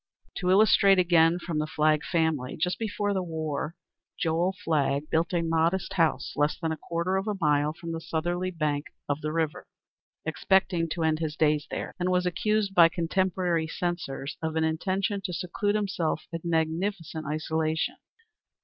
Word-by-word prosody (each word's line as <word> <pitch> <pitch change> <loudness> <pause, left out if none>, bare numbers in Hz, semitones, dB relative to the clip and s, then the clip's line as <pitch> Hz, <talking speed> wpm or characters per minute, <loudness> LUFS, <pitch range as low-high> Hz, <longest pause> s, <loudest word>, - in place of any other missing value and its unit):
To 180 - -1
illustrate 195 0 +6
again 170 -2 +4
from 170 -3 -3
the 155 - -1
Flagg 155 -1 +2
family, 155 -1 0
just 180 +3 -1
before 205 -2 -1
the 190 - 0
war 160 -2 -3 0.4
Joel 170 +3 +1
Flagg 145 -2 0
built 165 +1 +1
a 170 -2 +1
modest 165 +4 +1
house 165 -4 +1
less 145 +1 +1
than 165 -1 -1
a 160 - -3
quarter 170 +4 -1
of 195 +2 -2
a 210 -2 -1
mile 150 -2 +2
from 165 0 -7
the 165 0 -4
southerly 175 +3 -2
bank 150 -4 -1 0.2
of 145 +1 -1
the 155 - -2
river, 160 -1 -2 0.6
expecting 175 0 +1
to 165 +1 -2
end 155 -1 +2
his 155 -2 -2
days 150 -1 +2
there, - - -4
and 180 +1 0
was 180 0 +2
accused 200 +3 0
by 170 -3 +7
contemporary 175 -1 0
censors 165 -5 -4
of 160 -1 -2
an 160 - +2
intention 190 +5 -1
to 185 -2 -3
seclude 185 +4 -1
himself 190 -7 -1
in 165 - -2
magnificent 165 0 -1
isolation. 155 +1 -1
165 Hz, 165 wpm, -27 LUFS, 155-185 Hz, 0.6 s, by